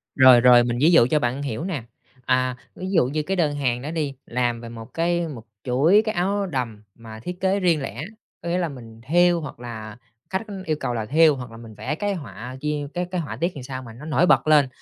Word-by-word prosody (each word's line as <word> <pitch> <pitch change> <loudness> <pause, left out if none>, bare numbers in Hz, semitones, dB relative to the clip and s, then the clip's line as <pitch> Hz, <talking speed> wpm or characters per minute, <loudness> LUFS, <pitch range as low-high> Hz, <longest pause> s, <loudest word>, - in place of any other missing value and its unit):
Rồi, 130 -2 +8
rồi, 120 0 +7
mình 120 0 -1
ví 160 - +6
dụ 165 -9 +6
cho 150 +4 +2
bạn 125 +1 -1
hiểu 130 -4 -3
nè. 170 -9 -3 0.4
À, 130 -1 +1 0.2
ví 185 +1 -5
dụ 165 -10 +4
như 150 +4 -2
cái 190 +5 -2
đơn 150 -4 +1
hàng 125 -4 -1
đó 150 - -5
đi, 155 -4 -2
làm 120 -1 -1
về 115 - -8
một 115 +1 -10
cái 170 +1 0
một 125 -8 -8 0.2
chuỗi 145 +11 +4
cái 215 - -2
áo 200 +3 0
đầm 125 - -4
mà 110 -1 -11
thiết 180 +10 -6
kế 190 +1 +2
riêng 170 -6 +2
lẻ, 135 - -5 0.4
có 170 - -4
nghĩa 175 - +1
là 175 -2 0
mình 115 -5 -11
thêu 175 +2 +4
hoặc 150 - -8
là 110 -3 -8 0.3
khách 190 - -1 0.2
yêu 155 -2 0
cầu 120 - -2
là 110 -2 -2
thêu 155 +3 +5
hoặc 125 -3 -8
là 115 - -11
mình 115 -1 -11
vẽ 135 +8 -3
cái 205 +4 -1
họa 125 - -8
chia 150 -1 -2
cái 180 0 -1
cái 180 -2 -1
họa 155 - -6
tiết 170 +2 -1
thì 135 - -7
sao 130 0 -6
mà 115 -2 -10
nó 135 +6 -11
nổi 160 +3 +2
bật 180 - +4
lên, 150 -3 +5
140 Hz, 250 wpm, -23 LUFS, 120-170 Hz, 0.4 s, Rồi